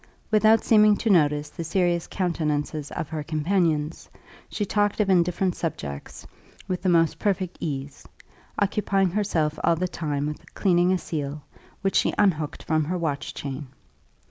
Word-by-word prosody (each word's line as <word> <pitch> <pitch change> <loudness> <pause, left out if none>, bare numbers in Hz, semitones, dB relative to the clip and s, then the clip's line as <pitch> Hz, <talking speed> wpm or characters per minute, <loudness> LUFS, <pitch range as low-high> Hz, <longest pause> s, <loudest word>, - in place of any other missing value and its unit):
Without 220 +1 +5
seeming 210 -2 +5
to 225 - +1
notice 150 -4 +3
the 170 - -6
serious 175 0 0
countenances 155 -4 -2
of 155 - -5
her 160 -1 -3
companions, 155 0 0 0.4
she 205 - -2
talked 205 +1 0
of 200 -2 +2
indifferent 180 +1 +2
subjects 70 - -5 0.4
with 185 -2 -2
the 185 - +1
most 165 -2 +3
perfect 190 -3 -1
ease, 140 -2 -5 0.5
occupying 195 -2 +1
herself 165 -7 0
all 170 - +4
the 180 +3 -1
time 145 -5 -3
with 150 0 -7
cleaning 180 -2 +3
a 185 - +3
seal, 150 -4 -4 0.4
which 195 - 0
she - - +2
unhooked 160 -7 +1
from 155 -1 +1
her 180 +4 -2
watch 150 -4 -3
chain. 140 0 -5
170 Hz, 150 wpm, -25 LUFS, 150-190 Hz, 0.5 s, Without